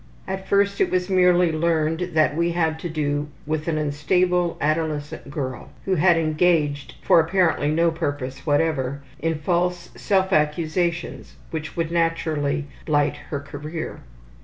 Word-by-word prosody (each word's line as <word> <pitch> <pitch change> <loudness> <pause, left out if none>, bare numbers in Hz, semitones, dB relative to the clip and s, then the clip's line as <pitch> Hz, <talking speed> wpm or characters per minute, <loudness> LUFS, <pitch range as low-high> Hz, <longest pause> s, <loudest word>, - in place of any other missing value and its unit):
At 190 0 -4
first 200 0 +2
it - - +3
was 185 +1 -1
merely 180 -2 +4
learned 165 +1 0
that 155 -2 +3
we 170 +1 +1
had 160 -2 0
to 175 - -4
do 145 -2 -1 0.2
with 155 +1 -2
an 160 -2 0
unstable, 175 +4 +1
adolescent 155 -2 -2
girl 130 -3 -5 0.2
who 195 - +1
had 175 0 +4
engaged 155 -3 +1
for - - +6
apparently 165 -3 +2
no 165 +2 +3
purpose 145 -5 -4
whatever 145 -3 0 0.2
in 165 +1 0
false 175 +2 -1
self 190 -2 +1
accusations 160 +3 -1 0.2
which 155 -1 -5
would 165 -1 -1
naturally 160 -4 0 0.2
blight 145 -1 +2
her 145 - -2
career. 150 +3 -6
160 Hz, 140 wpm, -23 LUFS, 150-175 Hz, 0.2 s, for